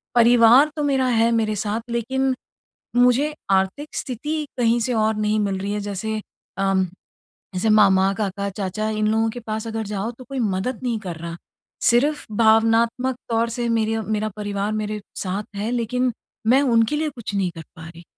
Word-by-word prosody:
परिवार 240 +4 +6
तो 300 - -2
मेरा 270 -2 +2
है 230 -1 +3
मेरे 220 -2 +1
साथ 210 +2 -2
लेकिन, 260 +3 0 0.6
मुझे 250 +5 +4 0.2
आर्थिक 195 +10 0
स्थिति 300 +5 -3
कहीं 235 0 +3
से 245 +2 0
और 220 -1 +1
नहीं 215 0 +1
मिल 195 -2 -1
रही 200 +2 -3
है 210 - -2
जैसे 205 +2 -3 0.5
उम, 195 -1 +2 0.7
जैसे 185 +5 0
मामा, 195 -2 +5
काका, 200 -1 -2
चाचा 195 +2 -3
इन 215 0 0
लोगों 225 +1 +2
के 245 +2 -7
पास 220 +1 -3
अगर 225 -1 -3
जाओ 205 +2 -3
तो 255 - -10
कोई 270 +2 -6
मदद 210 +3 -1
नहीं 240 -3 -1
कर 180 -5 -6
रहा। 170 +1 -6 0.5
सिर्फ़ 290 +6 +2
भावनात्मक 230 +3 +3
तौर 230 0 +1
से 240 -1 0
मेरे 225 -1 +1
मेरा 215 0 -1
परिवार 205 0 -2
मेरे 215 0 -3 0.2
साथ 195 +3 -2
है 210 +3 -2
लेकिन, 245 +1 0 0.3
मैं 265 +5 +5
उनके 230 +1 +2
लिए 310 +1 0
कुछ 235 -6 -7
नहीं 190 -2 0
कर 165 - -8
पा 160 +1 -9
रही। 170 0 -13
220 Hz, 180 wpm, -22 LUFS, 205-245 Hz, 0.7 s, परिवार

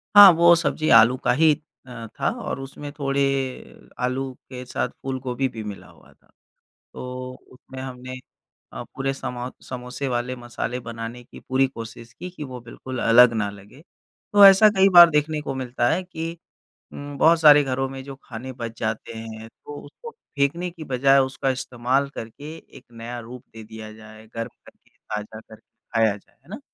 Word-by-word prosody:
हाँ, 205 -1 +12
वो 170 +1 +6
सब्ज़ी 160 -2 -1
आलू 120 +3 +7
का - - 0
ही 155 +4 +5 0.3
अ, 120 -2 -8
था - - +2
और - - -4
उसमें 140 +2 -8
थोड़े 140 -1 -1 0.8
आलू 130 +1 -2 0.2
के 125 -1 -7
साथ 125 - -2
फूलगोभी 130 0 -2
भी 110 -3 -8
मिला 105 -2 -8
हुआ - - -20
था। - - -34 0.7
तो 125 0 -7 0.2
उसमें 130 +1 -11
हमने 130 0 -8 0.5
अ, - - -6
पूरे 135 0 -3
समा 125 -2 -5 0.2
समोसे 125 +2 -5
वाले 125 +1 -2
मसाले 120 0 -5
बनाने 115 +1 -7
की - - -14
पूरी 135 +1 +1
कोशिश 115 -2 -10
की 180 +8 -8
कि 160 -4 -8
वो 130 -2 -8
बिल्कुल 130 +2 -8
अलग 120 +1 +7
न 100 - -2
लगे। 105 +8 -17 0.5
तो 205 -1 +8
ऐसा 195 +2 +8
कई 190 +1 +6
बार 175 -1 +10
देखने 150 0 0
को 135 - -4
मिलता 125 -2 -1
है 175 +4 0
कि 165 -2 -6 0.6
उम, 145 0 -8
बहुत 165 +3 +5
सारे 150 -2 +8
घरों 135 0 -2
में 135 0 -8
जो 135 0 -9
खाने 125 +2 -8
बच 115 -2 -7
जाते 110 +1 -3
हैं 110 0 -8
तो 145 +5 -11
उसको 460 - -11
फेंकने 170 - -2
की 170 -2 -10
बजाए 135 0 +3
उसका 135 0 -1
इस्तेमाल 130 +1 -1
करके 145 +8 -8
एक 135 -5 -16
नया 120 +1 -7
रूप 120 +2 -10
दे 110 -1 -10
दिया 110 0 -10
जाए, 110 0 -14
गर्म 115 0 -4 0.2
करके - - -20
ताज़ा 105 +1 -7
करके 110 0 -17 0.3
खाया 110 -3 +3
जाए 100 - -26
है - - -23
ना? - - -7
130 Hz, 180 wpm, -23 LUFS, 120-145 Hz, 0.8 s, हाँ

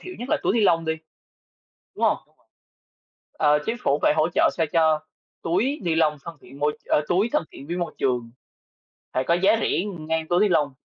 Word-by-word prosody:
thiểu 365 0 -9
nhất 245 - -6
là - - +2
túi - - +2
ni-lông 180 -7 +3
đi. 160 - 0 1.0
Đúng - - +1
không? - - +3 1.2
Ờ, 150 -1 +3
chính 225 - -1
phủ 140 +2 +2
phải - - +4
hỗ 155 0 +3
trợ - - +4
sao 165 - +2
cho 160 -2 +3 0.4
túi 220 - 0
ni-lông 160 -3 +2
thân 165 -2 -9
thiện 135 +3 -14
môi 150 0 0
ơ, - - +2
túi 190 +6 +2
thân 300 - +2
thiện 140 - -11
với 170 - -3
môi 175 -2 -3
trường, 120 -3 -1 0.8
phải 130 - +1
có 170 - +1
giá 190 +5 +4
rẻ, - - +1 0.2
ừm, 170 -6 -7
ngang 160 0 -1
túi 175 +2 +2
ni-lông. 160 -9 +2
165 Hz, 200 wpm, -24 LUFS, 150-180 Hz, 1.2 s, phải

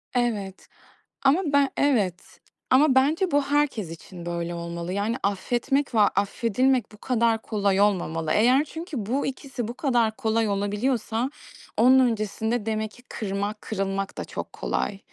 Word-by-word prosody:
Evet, 210 -6 -1 0.6
ama 275 +7 +4
ben 285 -1 +4
evet 210 -11 0 0.3
ama 270 +1 +5
bence 310 +8 +3
bu 290 -1 +3
herkes 280 - 0
için 170 +1 -10
böyle 170 0 -3
olmalı. 170 +1 -5
Yani, 205 +4 -1
affetmek 245 +7 0
ve 220 - +2
affedilmek 230 +4 +2
bu 210 - -15
kadar 230 -3 +1
kolay 200 -2 +1
olmamalı. 165 -6 +1
Eğer 250 +6 +4
çünkü 310 - -6
bu 265 +6 0
ikisi 265 -3 -5
bu 240 - -5
kadar 240 -6 +1
kolay 225 -3 +1
olabiliyorsa 220 +4 -1 0.5
onun 255 +3 +6
öncesinde 220 -1 0
demek 220 -1 -1
ki 245 - -17
kırmak, 205 +1 -3
kırılmak 195 -1 -3
da - - -3
çok - - -7
kolay. 195 - -2
225 Hz, 145 wpm, -25 LUFS, 200-260 Hz, 0.6 s, onun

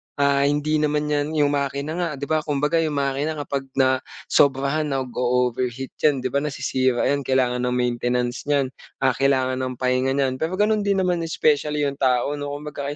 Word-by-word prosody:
ah, 140 0 +3
hindi 150 +2 +1
naman 150 0 0
'yan 150 +1 -1
'yong 145 -2 +3
makina 140 +1 -2
nga, 175 -1 0
'di 140 - -8
ba? 155 +2 +1
Kumbaga, 150 +2 0
'yong 155 -2 0
makina 140 +2 -1
kapag 140 -2 -4
nasobrahan 135 +2 +1
nag-oover 125 -2 0
heat 130 +2 -7
'yan, 140 -4 +2
'di 130 - -2
ba? 140 - +2
Nasisira 130 -3 0
'yan. 145 - +2
Kailangan 130 -2 +1
ng 125 - 0
maintenance 125 +1 -1
n'yan, 140 -3 +1 0.3
ah, 130 - +5
kailangan 130 0 +1
ng 130 -1 -3
pahinga 130 +1 0
n'yan. 130 -2 0
Pero 165 +3 -1
gano'n 210 +1 +1
din 195 -1 +2
naman 180 -1 +1
specially 150 -1 +1
'yong 140 0 -2
tao 130 0 +2
'no, 145 - -4
kumbaga 145 -1 -5
140 Hz, 180 wpm, -23 LUFS, 130-150 Hz, 0.3 s, ah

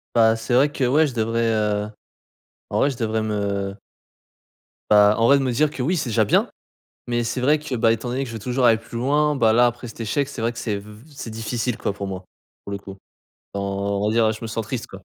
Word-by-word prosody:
Bah, 115 -1 +5
c'est 115 +2 -4
vrai 140 +3 +5
que, 140 -2 -3
ouais, 150 +5 +4
je 130 - -6
devrais, 115 0 0
heu, 105 -1 0 0.8
en - - +1
vrai, 140 - +3
je 130 - -5
devrais 110 -1 -1
me 100 -2 -2 1.2
bah, 105 0 +6
en 115 - +3
vrai, 140 0 +6
de - - -1
me 125 -2 0
dire 150 +5 +2
que 130 - -5
oui, 175 +8 +1
c'est 145 -7 -2
déjà 110 -1 +2
bien. - - +2 0.6
Mais 120 0 0
c'est 120 +2 -2
vrai 145 +4 +3
que, 150 -4 -4
bah, 115 -1 +3
étant 115 +2 -4
donné 130 +3 -1
que - - -6
je - - -7
veux - - -5
toujours 125 +2 0
aller 115 -1 +6
plus 115 +1 -9
loin, 145 +4 +2
bah 110 -2 +4
là, 120 +1 +5
après 120 0 -2
cet 115 - -9
échec, 135 +6 0
c'est 135 -5 -7
vrai 115 +1 +1
que 115 - -8
c'est 105 -3 -2
v 105 +1 -13 0.2
c'est 115 - -6
difficile, 115 +2 -3
quoi, 100 - -2
pour 100 -1 -5
moi, 95 -1 -6 0.4
pour 100 - -5
le - - -2
coup. 95 0 -11 0.6
Enfin, 100 0 -2
on 100 +1 -1
va - - +1
dire, 110 -1 +3
je 110 - -7
me 115 - -4
sens 110 -1 -3
triste, - - -4
quoi. - - -12
115 Hz, 255 wpm, -22 LUFS, 105-125 Hz, 1.2 s, bah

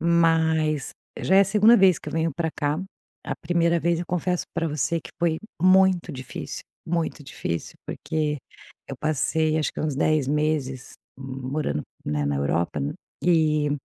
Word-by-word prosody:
Mas 160 -3 +2 0.3
já 190 - +3
é - - +9
a - - +6
segunda 215 +4 +6
vez 190 -5 +5
que - - -8
eu - - -6
venho 160 -1 0
para 165 -1 -1
cá. 145 +1 0 0.5
A - - -2
primeira 170 0 +2
vez, 170 0 +1
eu 175 - -4
confesso 180 0 -1
para 165 -1 0
você 155 +3 -1
que - - -11
foi 165 -1 +1 0.2
muito 185 -2 +4
difícil, 130 -1 -6 0.2
muito 165 -3 -2
difícil, 85 -10 -4
porque 150 -2 -2 0.5
eu 135 - -6
passei, 155 +2 +1
acho 150 - -1
que - - -5
uns 150 -3 -1
10 155 -3 +2
meses 145 -3 -1 0.3
morando, 135 - -3 0.2
né, 75 -1 -1
na 70 0 0
Europa, 75 +5 0 0.4
e, 155 -4 +3
155 Hz, 160 wpm, -25 LUFS, 145-170 Hz, 0.5 s, é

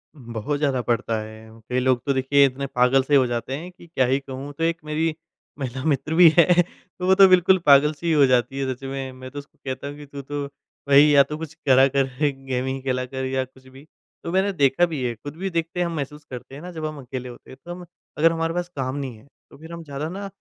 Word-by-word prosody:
बहुत 120 +1 -4
ज़्यादा 135 -4 +1
पड़ता 115 -1 -1
है। 110 +1 -11 0.2
कई 125 0 +1
लोग 130 -1 +2
तो 140 - +1
देखिए 135 +1 +4
इतने 135 +1 -2
पागल 125 +1 +3
से 145 +2 +2
हो 135 -2 +5
जाते 120 +2 -3
हैं, 175 +4 -8
कि 180 -1 -17
क्या 135 -6 +1
ही 130 +2 +1
कहूँ 135 +1 -8
तो 165 - -2
एक 165 0 +1
मेरी 155 +1 -1 0.5
महिला 130 0 -4
मित्र 145 0 0
भी 175 0 +8
हैं 170 - +7 0.5
तो 180 - -2
वो 190 - +5
तो 195 0 +8
बिल्कुल 185 +1 +5
पागल 145 +1 +6
सी 170 +3 -7
ही 165 - +2
हो 145 -2 +6
जाती 130 +1 +1
है 130 -1 -1
सच 130 - -17
में। 135 -1 -5
मैं 130 0 -10
तो 145 - -6
उसको 140 - -15
कहता 130 +1 -4
हूँ 145 - -7
कि, 145 - -10
"तू 140 0 -8
तो 145 +1 -4 0.4
भई 140 +1 +8
या 145 -2 +6
तो 150 +2 -6
कुछ 160 -1 -7
करा 135 +1 +6
कर 135 0 +1 0.4
गेमिंग 130 +1 -2
खेला 130 -1 -1
कर 130 +1 -5
या 130 0 -1
कुछ 130 0 -21
भी।" 135 +3 -15 0.4
तो 170 - -4
मैंने 190 +2 +2
देखा 145 +2 +3
भी 155 -6 -4
है, 120 - -1
खुद 145 +6 -9
भी 195 +1 -3
देखते 170 +1 -3
हैं 175 - +2
हम 170 - -5
महसूस 150 0 -5
करते 125 +2 -8
हैं 145 - -9
ना 180 - -8
जब 160 -2 -5
हम 155 -1 -5
अकेले 125 0 -6
होते 120 - -14
हैं। 130 - -12
तो 175 - -7
हम 175 0 -8 0.3
अगर 165 +2 +4
हमारे 165 0 -1
पास 175 0 -2
काम 130 -1 -3
नहीं 135 -5 -5
है, 120 - -20 0.2
तो - - -16
फिर 160 +3 -12
हम 170 - -7
ज़्यादा 145 +1 -5
ना 200 +2 -6
140 Hz, 260 wpm, -23 LUFS, 130-160 Hz, 0.5 s, भी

